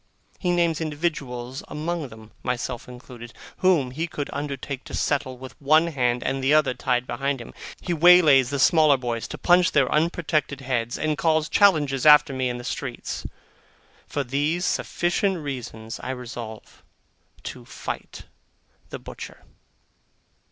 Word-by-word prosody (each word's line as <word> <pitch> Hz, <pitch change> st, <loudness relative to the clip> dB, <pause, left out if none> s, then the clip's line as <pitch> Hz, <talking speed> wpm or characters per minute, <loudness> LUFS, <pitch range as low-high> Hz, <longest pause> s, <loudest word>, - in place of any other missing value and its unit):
He 180 Hz, -, -1 dB
names 170 Hz, -2 st, +1 dB
individuals 140 Hz, -5 st, -3 dB
among 160 Hz, 0 st, -3 dB
them 110 Hz, -2 st, -14 dB
(myself 125 Hz, -1 st, -3 dB
included), 125 Hz, -1 st, -11 dB, 0.2 s
whom 170 Hz, -9 st, +3 dB
he 160 Hz, +6 st, -3 dB
could 145 Hz, -3 st, -5 dB
undertake 140 Hz, -1 st, -4 dB
to -, -, -6 dB
settle 135 Hz, -3 st, -1 dB
with 130 Hz, -2 st, -10 dB
one 155 Hz, +4 st, +5 dB
hand, 125 Hz, -4 st, 0 dB
and 135 Hz, 0 st, -2 dB
the 140 Hz, +3 st, +4 dB
other 150 Hz, -4 st, +3 dB
tied 125 Hz, -1 st, 0 dB
behind 135 Hz, +3 st, -2 dB
him. 120 Hz, -, -10 dB, 0.3 s
He 175 Hz, -, -2 dB
waylays 160 Hz, -6 st, +6 dB
the 140 Hz, -, -2 dB
smaller 155 Hz, 0 st, +5 dB
boys 120 Hz, -3 st, -3 dB
to -, -, -7 dB
punch 180 Hz, 0 st, +4 dB
their 135 Hz, -3 st, +3 dB
unprotected 155 Hz, -3 st, 0 dB
heads, 120 Hz, -2 st, -2 dB
and 155 Hz, -2 st, -1 dB
calls 160 Hz, +1 st, +2 dB
challenges 150 Hz, -10 st, +3 dB
after 150 Hz, -2 st, +7 dB
me 130 Hz, -1 st, -1 dB
in 120 Hz, -, -3 dB
the 120 Hz, -, -8 dB
open -, -, -3 dB
streets. -, -, -5 dB, 0.8 s
For 145 Hz, -, -2 dB
these 145 Hz, +7 st, 0 dB
sufficient 185 Hz, +2 st, 0 dB
reasons 120 Hz, -7 st, -6 dB
I -, -, -6 dB
resolve 120 Hz, -3 st, -7 dB, 0.6 s
to -, -, -7 dB
fight -, -, -7 dB, 0.7 s
the -, -, -6 dB
butcher. -, -, -10 dB
140 Hz, 150 wpm, -24 LUFS, 125-155 Hz, 0.8 s, after